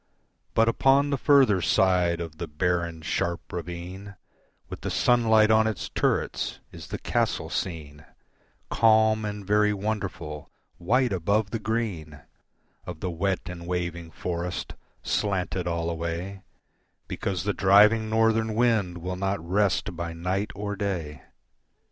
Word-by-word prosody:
But 115 Hz, 0 st, +4 dB
upon 135 Hz, +4 st, +3 dB
the -, -, +2 dB
further 130 Hz, -11 st, +4 dB
side 90 Hz, +1 st, +2 dB
of 80 Hz, -2 st, -7 dB
the 85 Hz, -, -4 dB
barren, 85 Hz, +1 st, -1 dB
sharp 85 Hz, +2 st, -2 dB
ravine 90 Hz, +3 st, -7 dB, 0.5 s
With -, -, -8 dB
the -, -, -3 dB
sunlight 110 Hz, -3 st, +4 dB
on 110 Hz, 0 st, +4 dB
its 110 Hz, -3 st, -3 dB
turrets -, -, -1 dB
is -, -, -10 dB
the -, -, -4 dB
castle -, -, -1 dB
seen, 75 Hz, -4 st, -4 dB, 0.7 s
Calm 110 Hz, -1 st, +4 dB
and 105 Hz, -1 st, -5 dB
very 105 Hz, +1 st, +3 dB
wonderful, 95 Hz, -7 st, -4 dB, 0.3 s
white 120 Hz, +6 st, +2 dB
above 100 Hz, +4 st, 0 dB
the 115 Hz, -, -2 dB
green 100 Hz, -10 st, -3 dB, 0.6 s
Of 90 Hz, -3 st, -8 dB
the 90 Hz, -, -3 dB
wet 95 Hz, +3 st, -1 dB
and 85 Hz, -1 st, -8 dB
waving 85 Hz, -2 st, -3 dB
forest, 85 Hz, +2 st, -4 dB, 0.3 s
slanted 95 Hz, -3 st, -1 dB
all 85 Hz, -1 st, -1 dB
away, 85 Hz, +4 st, -4 dB, 0.7 s
Because 95 Hz, -4 st, -3 dB
the 105 Hz, +1 st, 0 dB
driving 105 Hz, +4 st, +5 dB
Northern 110 Hz, 0 st, +2 dB
wind 110 Hz, -7 st, +1 dB
will 90 Hz, +1 st, -3 dB
not 100 Hz, +1 st, -1 dB
rest 95 Hz, -1 st, +1 dB
by 85 Hz, 0 st, -4 dB
night 90 Hz, +5 st, -2 dB
or 100 Hz, 0 st, -4 dB
day. 85 Hz, -9 st, -4 dB
95 Hz, 135 wpm, -26 LUFS, 85-110 Hz, 0.7 s, driving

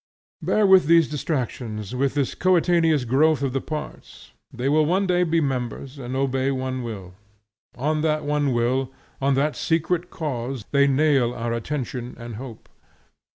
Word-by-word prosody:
Bear 215 Hz, -, +2 dB
with 190 Hz, -5 st, +6 dB
these 165 Hz, -1 st, +5 dB
distractions, 125 Hz, -, -4 dB
with 135 Hz, +2 st, 0 dB
this 140 Hz, -3 st, 0 dB
coetaneous 170 Hz, -5 st, +2 dB
growth 140 Hz, +4 st, +3 dB
of 135 Hz, -2 st, -1 dB
the 135 Hz, -, -1 dB
parts; 155 Hz, -1 st, -8 dB, 0.2 s
they 125 Hz, +2 st, -3 dB
will 155 Hz, +2 st, +4 dB
one 185 Hz, +6 st, +1 dB
day 180 Hz, -1 st, +2 dB
be 165 Hz, -1 st, +2 dB
members, 135 Hz, 0 st, -3 dB
and 125 Hz, 0 st, -5 dB
obey 135 Hz, 0 st, 0 dB
one 130 Hz, -1 st, -2 dB
will. 100 Hz, -6 st, -7 dB, 0.6 s
On 150 Hz, +4 st, 0 dB
that 155 Hz, -1 st, 0 dB
one 145 Hz, -1 st, +1 dB
will, 125 Hz, +2 st, 0 dB, 0.3 s
on 135 Hz, 0 st, +2 dB
that 145 Hz, +3 st, +1 dB
secret 170 Hz, +2 st, 0 dB
cause, 130 Hz, -6 st, -4 dB
they 140 Hz, -1 st, +4 dB
nail 135 Hz, -3 st, +2 dB
our 115 Hz, -1 st, -2 dB
attention 125 Hz, 0 st, -4 dB
and 115 Hz, -2 st, -8 dB
hope. 120 Hz, -3 st, -9 dB
135 Hz, 155 wpm, -23 LUFS, 125-155 Hz, 0.6 s, with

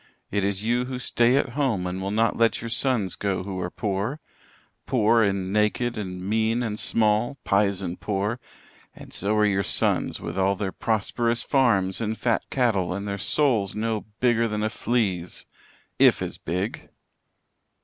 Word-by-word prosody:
It 100 Hz, -1 st, 0 dB
is 100 Hz, 0 st, -1 dB
you 120 Hz, +2 st, +1 dB
who 130 Hz, 0 st, -4 dB
stay 125 Hz, 0 st, +2 dB
at 140 Hz, -, +1 dB
home 120 Hz, -8 st, 0 dB
and 90 Hz, +1 st, -3 dB
will 95 Hz, -, -2 dB
not 110 Hz, +3 st, +1 dB
let 115 Hz, 0 st, +2 dB
your 115 Hz, 0 st, -6 dB
sons 120 Hz, -6 st, 0 dB
go 95 Hz, -3 st, -2 dB
who 95 Hz, -1 st, -5 dB
are 90 Hz, -, -2 dB
poor 100 Hz, -, -2 dB, 0.7 s
poor 115 Hz, -2 st, +3 dB
and 100 Hz, -2 st, 0 dB
naked 105 Hz, +3 st, +1 dB
and 95 Hz, -3 st, -5 dB
mean 110 Hz, +3 st, +1 dB
and 110 Hz, -2 st, -3 dB
small 110 Hz, +4 st, +1 dB
pisen 100 Hz, -3 st, +1 dB
poor, 105 Hz, +3 st, -2 dB, 0.6 s
and -, -, -12 dB
so 100 Hz, +3 st, 0 dB
are 105 Hz, 0 st, +4 dB
your 100 Hz, -1 st, +2 dB
sons, -, -, 0 dB
with 85 Hz, +3 st, -5 dB
all 95 Hz, +1 st, +2 dB
their 95 Hz, -1 st, -3 dB
prosperous 115 Hz, +3 st, 0 dB
farms 105 Hz, -8 st, +2 dB
and 110 Hz, 0 st, -2 dB
fat 120 Hz, -2 st, +1 dB
cattle 100 Hz, -9 st, +1 dB
and 100 Hz, +1 st, -4 dB
their 100 Hz, 0 st, -3 dB
souls 110 Hz, -5 st, +2 dB
no 110 Hz, 0 st, -2 dB
bigger 120 Hz, -2 st, +3 dB
than 105 Hz, -1 st, -2 dB
a 110 Hz, -, 0 dB
flea's 95 Hz, -10 st, -1 dB, 0.5 s
if -, -, +6 dB
as -, -, -5 dB
big." 95 Hz, +5 st, -4 dB
105 Hz, 170 wpm, -25 LUFS, 95-115 Hz, 0.7 s, if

